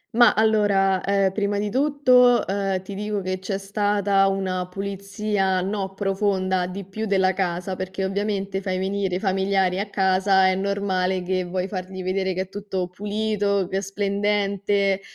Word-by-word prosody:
Ma, 240 -2 +6
allora, 205 -3 +2
ehm, 195 -1 +1
prima 205 0 -1
di 205 0 -1
tutto, 255 -1 +4
ehm, 195 -1 -1
ti 200 - -8
dico 210 +1 -2
che 185 -1 -3
c'è 195 +1 -3
stata 200 0 +1
una 190 -2 -1
pulizia, 195 0 -2
no 195 +1 -3
profonda, 190 -2 0
di 190 +1 -7
più, 215 +4 -5
della 190 -2 +2
casa, 180 0 -2
perché 185 +1 -4
ovviamente 195 0 -2
fai 185 -1 -2
venire 190 -1 -1
i - - -1
familiari 190 -1 +1
a 200 +1 -3
casa, 190 -1 +3
è 185 - +2
normale 190 -1 -1
che 185 +1 -1
vuoi 180 +1 -3
fargli 185 -1 -6
vedere 190 +1 -1
che 185 - -2
è 190 - -16
tutto 195 -2 -4
pulito, 205 0 -1
che 190 - -5
è - - 0
splendente, 200 0 0
195 Hz, 160 wpm, -23 LUFS, 190-205 Hz, -, Ma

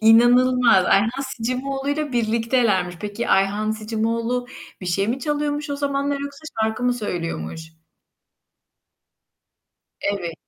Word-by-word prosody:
İnanılmaz. 240 -1 +5
Ayhan 225 +7 +2
Sicimoğlu'yla 275 +4 -2
birliktelermiş. 225 -5 +1
Peki, 210 +3 -4
Ayhan 200 +3 +2
Sicimoğlu, 230 +3 -1
eee, - - -13 0.3
bir 185 - -7
şey 195 +4 0
mi 245 +3 0
çalıyormuş 295 +1 -2
o 285 - -2
zamanlar 280 0 -1
yoksa 280 +1 -7 0.2
şarkı 220 +2 -1
mı 250 0 +3
söylüyormuş? 165 - -4 2.3
Evet. 185 -5 -2
230 Hz, 110 wpm, -22 LUFS, 205-270 Hz, 2.3 s, İnanılmaz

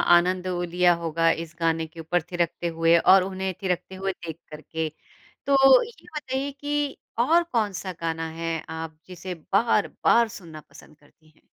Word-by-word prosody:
आनंद 180 +1 +2
ओ, 180 -1 -2
लिया 175 0 +3
होगा 165 +1 +2
इस 170 +1 -14
गाने 165 -1 +1
के 165 +1 -14
ऊपर 170 +2 0
थिरकते 175 0 -1
हुए 165 +1 +5
और 185 +2 +6
उन्हें 190 0 -3
थिरकते 185 0 -2
हुए 195 +1 -2
देख 165 -3 -8
कर 150 0 -8
के, 160 -1 -3 0.6
तो 270 -1 +6
ये 470 0 -13
बताइए 275 -1 -3
कि 290 0 -2 0.2
और 330 +8 +4
कौन-सा 210 - -2
गाना 165 0 -2
है 165 0 -1 0.3
आप 160 -1 -7
जिसे 185 0 -7 0.2
बार-बार 230 +2 +3
सुनना 160 -5 -11
पसंद 150 +1 -16
करती 155 +1 -26
हैं? - - -29
180 Hz, 165 wpm, -25 LUFS, 165-215 Hz, 0.6 s, और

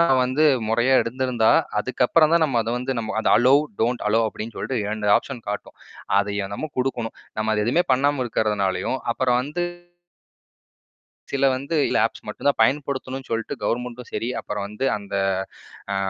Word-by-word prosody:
நான் 135 -6 +4
வந்து 130 +5 +1 0.3
முறையா 120 +4 +3
இருந்திருந்தா, 125 -2 +1 0.3
அதுக்கப்புறம் 160 -1 +2
தான் 170 -1 +4
நம்ம 125 -4 0
அத 110 - -6
வந்து 130 +1 -2
நம்ம 110 -1 -4
அத - - +1
அலோ 125 +3 +5 0.3
டோன்ட் 120 +2 0
அலோ 115 +2 +3
அப்டின்னு 110 +2 -7
சொல்ட்டு 110 +4 -2
2 105 0 -2
ஆப்ஷன் 125 -5 -9
காட்டும். 105 - -6 0.4
அதை 100 0 -3 0.2
நம்ம 155 - -4
குடுக்கணும். 125 -3 -2 0.2
நம்ம 110 0 0
அது 105 - +1
எதுவுமே 165 +9 +2
பண்ணாம 140 +1 +2
இருக்கறதுனாலயும் 105 -5 0 0.3
அப்புறம் 125 +1 +1
வந்து 150 +6 -3 1.7
சில 140 0 +1
வந்து 140 +5 -4
இல்ல - - +1
ஆப்ஸ் 115 -1 -11
மட்டும் 105 - -2
தான் 140 - +1
பயன்படுத்தணும்னு 135 +1 -1
சொல்ட்டு 115 0 -2
கவர்மெண்ட்டும் 125 +2 -3
சரி, 115 - -2
அப்புறம் 105 -1 -4
வந்து 105 +6 -5
அந்த 100 -1 -8 0.8
ஆ - - 0
125 Hz, 160 wpm, -23 LUFS, 110-135 Hz, 1.7 s, அலோ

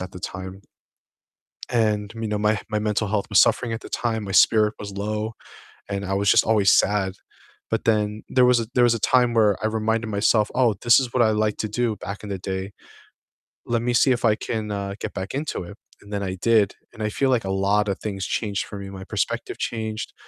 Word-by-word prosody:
at 90 0 -6
the 90 - -9
time. 95 +2 -7 1.1
And, 105 -2 0
me 115 -1 -4
know, 105 0 -1
my 105 +1 +2
h 100 - -4
my 105 - -1
mental 105 0 -1
health 100 -1 -1
was 100 - +5
suffering 120 -2 +2
at 115 - -4
the - - -10
time, 110 -3 -2
my 95 - -5
spirit 105 +2 +4
was 100 -1 -7
low, 105 +2 -3 0.6
and 100 0 -3
I 95 - -2
was 100 0 +1
just - - +5
always 105 -3 +4
sad, 95 -2 +2 0.6
but - - -2
then 105 -1 +1
there 125 -1 +4
was 125 -1 +4
a 110 - -5
there 125 - +5
was 120 -1 +5
a - - -4
time 125 0 +3
where 105 -4 +3
I 110 - +2
reminded 110 +1 -1
myself, 105 +1 +2
"Oh, 120 -4 +3
this 120 +2 +6
is 125 -3 -4
what 125 - +2
I 110 - +3
liked 105 -1 0
to 110 - -3
do 115 0 -1
back 100 +2 -7
in 105 - -7
the 100 - -3
day, 95 +1 -4 0.9
let 115 -1 0
me 120 0 0
see 130 +2 +4
if 125 -1 0
I 110 -2 +4
can, 110 -1 -4
uh, 100 -1 -4
get - - -5
back 95 +1 -5
into 140 -7 -3
it," 100 +4 -11 0.2
and 100 - -15
then 100 -1 -2
I 95 -1 -3
did, 105 0 +2 0.2
and 110 - -10
I 105 - 0
feel 135 +5 0
like 120 -6 +1
a 95 - -2
lot 100 +2 +1
of 100 - -2
things 100 -3 -4
changed 100 -3 -2
for 100 - -8
me, 100 0 -7
my 95 -1 -8
perspective - - -3
changed, 110 -1 -4
105 Hz, 235 wpm, -23 LUFS, 100-115 Hz, 1.1 s, this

